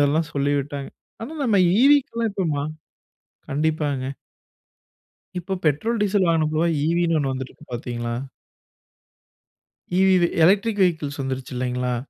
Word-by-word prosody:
இதெல்லாம் 150 +2 +2
சொல்லி 140 0 +1
விட்டாங்க. 140 0 -5 0.3
ஆனா, 245 +7 -6
நம்ம 220 -5 +3 0.2
ஈவிக்கெல்லாம் 255 -4 +3
இப்போமா 160 -8 -1 0.9
கண்டிப்பாங்க. 150 -2 0 1.3
இப்ப 190 +2 -3
பெட்ரோல் 210 - +1
டீசல் 200 -2 +2
வாங்குனப்போ 155 -1 +1 0.2
ஈவின்னு 170 +1 +2
ஒண்ணு 135 -3 0
வந்துருக்கு 130 +3 -7
பார்த்தீங்களா? 120 -1 -4 1.8
ஈவிவி 185 -2 +4 0.2
எலக்ட்ரிக் 205 +3 +3
வெஹிக்கிள்ஸ் 150 -5 -1
வந்துருச்சு 130 -1 -4
இல்லைங்களா? 125 0 -1
155 Hz, 105 wpm, -23 LUFS, 140-190 Hz, 1.8 s, ஈவிவி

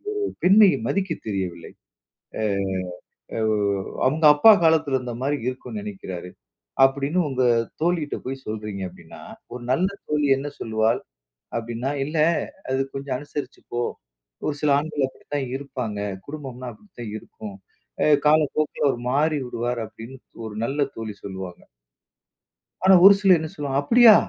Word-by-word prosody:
அவர் 415 - -1
ஒரு - - -6
பெண்மையை 195 +1 +7
மதிக்க 195 -2 0 0.2
தெரியவில்லை. 90 -4 -4 0.7
அ - - -1 1.0
அவ் 110 -1 +2 0.5
அவுங்க 155 +4 +1
அப்பா 150 +10 +8
காலத்தில 160 -4 +3
இருந்த 125 -2 -5
மாரி 145 +2 0
இருக்குன்னு 130 +11 -5
நெனைக்கிறாரு." 95 - -7 0.5
அப்படீன்னு 140 +6 +2
உங்க 130 -1 0 0.4
தோழிட்ட 165 -3 0
போய் 135 0 -5
சொல்றீங்க 105 -2 -5
அப்படீன்னா, - - -13 0.3
ஒரு 125 - -7
நல்ல 180 +8 +2 0.2
தோழி 150 -1 +1
என்ன 140 +2 -4
சொல்லுவாள் 110 +1 +1 0.6
அப்படீன்னா, 120 +3 -3
"இல்ல 150 +4 -4 0.6
அது 130 - +1
கொஞ்சம் 135 -1 -3
அனுசரிச்சு 145 -2 -7
போ. 120 - 0 0.7
ஒரு 150 - 0
சில 150 - +2
ஆண்கள் 150 -2 -1
அப்படித்தான் 140 0 -5
இருப்பாங்க. 125 -7 -5 0.3
குடும்பம்ன்னா 135 -4 -7
அப்படித்தான் 160 - -10
இருக்கும். 105 -1 -10 0.5
அ - - +4 0.2
காலப்போக்கில 155 -1 +2
அவர் 120 -3 -1
மாறிவிடுவார்." 130 -5 0
அப்படீன்னு 115 +4 -11 0.3
ஒரு 105 - -7
நல்ல 140 +3 -2 0.2
தோழி 110 -2 -5
சொல்லுவாங்க. 95 -2 -7 1.2
ஆனா, 190 0 +8
ஒரு 200 +1 +11
சிலர் 190 -4 +6
என்ன 160 - -4
சொல்லுவாங்க, 140 -2 -1
"அப்படியா! 230 +8 +8
135 Hz, 135 wpm, -24 LUFS, 115-155 Hz, 1.2 s, ஒரு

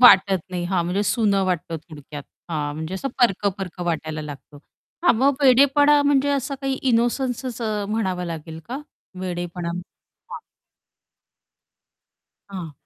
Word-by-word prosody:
वाटत 195 -5 +8
नाही 180 -1 -2
हां 180 -1 +1
म्हणजे 185 +4 0
सुनं 205 -1 +2
वाटतं 175 -3 -1
थोडक्यात. 145 -1 -9 0.3
हां 150 -2 -2
म्हणजे 160 +4 -4
असं 190 +8 -3
परक-परक 195 -5 +1
वाटायला 155 -3 -2
लागतो. 145 -1 -9 0.5
हां 345 -8 +5
मग 270 +4 +4
वेडेपणा 280 +3 +6
म्हणजे 285 -1 +3
असं 275 0 -1
काही 270 -1 0 0.2
इनोसन्सच 245 +1 0 0.3
म्हणावं 190 -5 -1
लागेल 160 -1 -6
का 260 +3 -3 0.4
वेडेपणा? 175 -1 -4 0.6
हां. - - -6 2.1
हां. 180 -5 -6
190 Hz, 120 wpm, -23 LUFS, 170-250 Hz, 2.1 s, वाटत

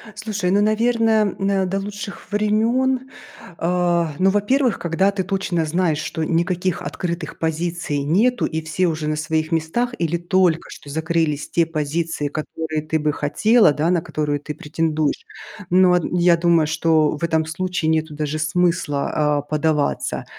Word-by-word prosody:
Слушай, 210 -4 -2
ну, 200 +2 +3
наверное, 220 -1 +2
м, 195 -1 0
до 195 - -1
лучших 205 +1 -7
времен, 240 +5 +1 0.5
а, 175 -2 +1
ну, 190 - +4
во-первых, 225 +5 +1
когда 185 +4 +1
ты 195 -2 -2
точно 190 -3 -1
знаешь, 160 -1 0
что 160 0 -3
никаких 175 +2 0
открытых 170 -1 -4
позиций 160 -2 -2
нету 220 - +2
и 160 0 -2
все 160 +3 0
уже 155 -2 -2
на 155 - 0
своих 155 +1 -1
местах 165 +10 -1
или 170 0 0
только 175 -1 +1
что 145 - -11
закрылись 160 -1 -1
те 170 - +2
позиции, 160 0 -2
которые 155 +1 -4
ты 155 +1 -1
бы 150 0 +1
хотела, 210 +7 +3
да, 155 +3 0
на 175 -2 +2
которые 150 -3 -2
ты 150 +1 -7
претендуешь. 155 0 -1 0.4
Ну, 180 0 +5
а, - - +5
н 175 0 +2
думаю, 170 -3 +3
что 160 -1 +2
в 170 - -9
этом 160 -1 +1
случае 170 0 -2
нету 160 -1 0
даже 150 0 -3
смысла, 160 -3 0 0.3
а, - - -3
подаваться. 150 0 -1
170 Hz, 155 wpm, -21 LUFS, 155-195 Hz, 0.5 s, Ну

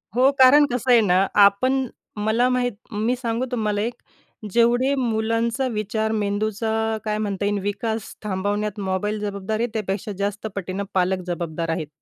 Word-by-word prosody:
हो 260 +2 +5
कारण 285 +3 +8
कसं 250 +1 0
आहे 235 -2 +7
ना, 190 -1 +3
आपण 255 +7 +4 0.4
मला 230 +3 +3
माहीत 250 -1 +1 0.2
मी 220 +4 0
सांगू 240 0 -2
तुम्हाला 210 -3 0
एक. 235 +2 -2 0.6
जेवढे 240 +4 +3
मुलांचा 230 +1 0
विचार 215 +1 -1
मेंदूचा 215 +1 -1 0.3
काय 210 0 -1
म्हणता 200 -2 -2
येईल 205 0 0
विकास 215 +2 -3
थांबवण्यात 205 +1 -2
मोबाईल 200 +2 -1
जबाबदार 205 +1 -3
आहे 240 - +1
त्यापेक्षा 205 -1 -3
जास्त 205 +2 -2
पटीने 195 +1 -3
पालक 185 0 +1
जबाबदार 170 -1 -3
आहेत. 165 -2 -2
215 Hz, 150 wpm, -23 LUFS, 200-235 Hz, 0.6 s, कारण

